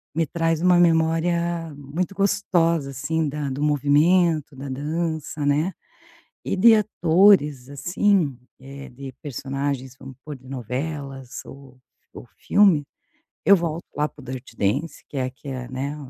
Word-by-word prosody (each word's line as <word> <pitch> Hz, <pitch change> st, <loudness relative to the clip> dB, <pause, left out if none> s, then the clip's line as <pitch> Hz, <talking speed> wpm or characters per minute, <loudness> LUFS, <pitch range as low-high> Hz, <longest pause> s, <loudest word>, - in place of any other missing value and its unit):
me 165 Hz, 0 st, +2 dB
traz 165 Hz, +1 st, 0 dB
uma 180 Hz, 0 st, +5 dB
memória 165 Hz, 0 st, +1 dB
muito 150 Hz, +7 st, -4 dB
gostosa 170 Hz, -6 st, +1 dB
assim 145 Hz, +3 st, -1 dB
da 145 Hz, -1 st, -3 dB
do 135 Hz, +3 st, -3 dB
movimento, 150 Hz, +1 st, +3 dB
da 140 Hz, +1 st, -7 dB
dança, 155 Hz, +1 st, -3 dB
né, 150 Hz, +6 st, +2 dB, 0.7 s
e -, -, -1 dB
de 225 Hz, +3 st, +7 dB
atores 170 Hz, -, +3 dB
assim, 165 Hz, 0 st, +1 dB, 0.2 s
eh, 140 Hz, +1 st, -10 dB
de 135 Hz, +1 st, -9 dB
personagens, 135 Hz, -1 st, -4 dB
vamos 135 Hz, -1 st, -10 dB
pôr 150 Hz, -2 st, -6 dB
de 130 Hz, -, -21 dB
novelas 135 Hz, +1 st, -5 dB
ou 135 Hz, -2 st, -13 dB, 0.3 s
ou -, -, -10 dB
filme, 190 Hz, -8 st, +4 dB, 0.6 s
eu 200 Hz, -, +8 dB
volto 165 Hz, 0 st, -3 dB
lá 150 Hz, +1 st, +1 dB
para 145 Hz, -, -16 dB
o -, -, -14 dB
Dirty 130 Hz, -2 st, -8 dB
Dancing 135 Hz, +12 st, -1 dB
que 140 Hz, -, -7 dB
é 130 Hz, -1 st, -1 dB
que 140 Hz, +2 st, -11 dB
é, 125 Hz, -2 st, -5 dB
né, 135 Hz, +3 st, -4 dB
150 Hz, 145 wpm, -23 LUFS, 135-170 Hz, 0.7 s, eu